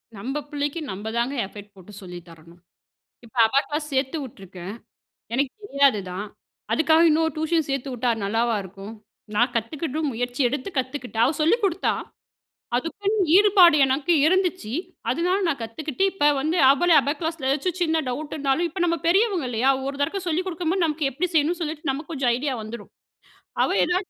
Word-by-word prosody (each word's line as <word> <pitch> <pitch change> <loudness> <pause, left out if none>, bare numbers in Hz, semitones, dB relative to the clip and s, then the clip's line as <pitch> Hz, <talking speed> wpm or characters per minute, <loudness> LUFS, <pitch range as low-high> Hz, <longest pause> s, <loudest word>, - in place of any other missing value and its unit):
நம்ப 265 +9 -4
பிள்ளைக்கு 290 +2 -2
நம்ப 200 +3 -6
தாங்க 240 +4 0
எஃபர்ட் 205 +1 -12
போட்டு 190 +2 -14
சொல்லி 180 -2 -8
தரணும். 165 +1 -16 0.7
இப்போ 235 +2 -11
அபாகிளாஸ் 295 +5 -1
சேர்த்து 265 +3 0
விட்ருக்கேன். 195 -6 -9 0.6
எனக்கு 270 +1 0
தெரியாது 280 - +3
தான். 190 +4 -5 0.5
அதுக்காக 315 +1 +4
இன்னொரு 320 +1 +2
டியூஷன் 315 0 0
சேர்த்து 275 0 -2
விட்டா 245 0 0
நல்லாவா 225 +3 +1
இருக்கும்? 195 +3 -10 0.4
நான் 240 +4 +2
கத்துகிட்டு 285 +6 -3
முயற்சி 245 +3 -4
எடுத்து 280 +6 -4
கத்துக்கிட்டேன். 250 -4 -1
அவ 275 - +1
சொல்லிக் 425 +10 +3
கொடுத்தா. 380 -1 +1 0.8
அதுக்குன்னு 395 - -2 0.2
ஈடுபாடு 390 -5 +7
எனக்கு 275 +6 +1
இருந்துச்சு. 365 - +1 0.4
அதனால 360 +3 +1
நான் 280 -6 -1
கத்துக்கிட்டு, 275 +8 -4
இப்போ 325 -6 +1
வந்து 310 +5 0
அவளே 340 +5 +4
அபா 280 - -1
கிளாஸில 320 -5 -2
ஏதாச்சும் 325 +6 -1
சின்ன 320 -1 +1
டவுட் 290 +5 -4
இருந்தாலும், 285 +3 0
இப்போ 350 +3 -7
நம்ம 335 -1 +1
பெரியவங்க 380 - +2
இல்லையா? 245 +3 +2 0.2
ஒரு 275 0 -3
தடக்க 325 +8 0
சொல்லிக் 345 +3 -1
கொடுக்கும்போது, 350 +1 0
நமக்கு 305 -2 0
எப்டி 290 +8 -1
செய்யணும்னு 325 +3 +1
சொல்லிட்டு 310 -2 -3
நமக்கு 295 +5 -5
கொஞ்சம் 265 -5 +1
ஐடியா 275 +2 -2
வந்துடும். 220 +2 -9 0.7
அவ - - +1 0.2
ஏதாவது 365 +2 -1
285 Hz, 160 wpm, -24 LUFS, 240-330 Hz, 0.8 s, ஈடுபாடு